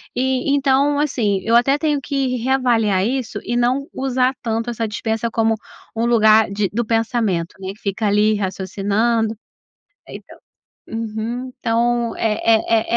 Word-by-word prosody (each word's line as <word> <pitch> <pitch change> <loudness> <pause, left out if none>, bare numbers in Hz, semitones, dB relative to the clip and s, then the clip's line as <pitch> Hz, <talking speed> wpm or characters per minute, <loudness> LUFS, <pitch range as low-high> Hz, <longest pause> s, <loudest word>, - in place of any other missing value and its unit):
E, 260 +2 0
então, 280 +1 +2
assim, 220 -10 0
eu 230 - 0
até 270 +4 +4
tenho 295 -1 0
que 270 -2 -1
reavaliar 230 -6 +1
isso 255 +1 -2
e 240 - -2
não 255 +4 +1
usar 260 -1 0
tanto 230 +1 -2
essa 230 -1 -2
dispensa 220 +2 -2
como 225 0 +1 0.4
um 225 +1 0
lugar 220 -2 +5
de 200 -1 -1
do 235 +2 -1
pensamento, 225 -6 -1
né. 190 0 -5
Que 210 - -23
fica 205 +2 -2
ali 210 +1 +3
raciocinando 205 +3 -1 0.7
então, - - -12 0.5
uhum, 225 +3 -4
então 235 0 0
é 225 +1 +1
230 Hz, 140 wpm, -20 LUFS, 215-255 Hz, 0.7 s, lugar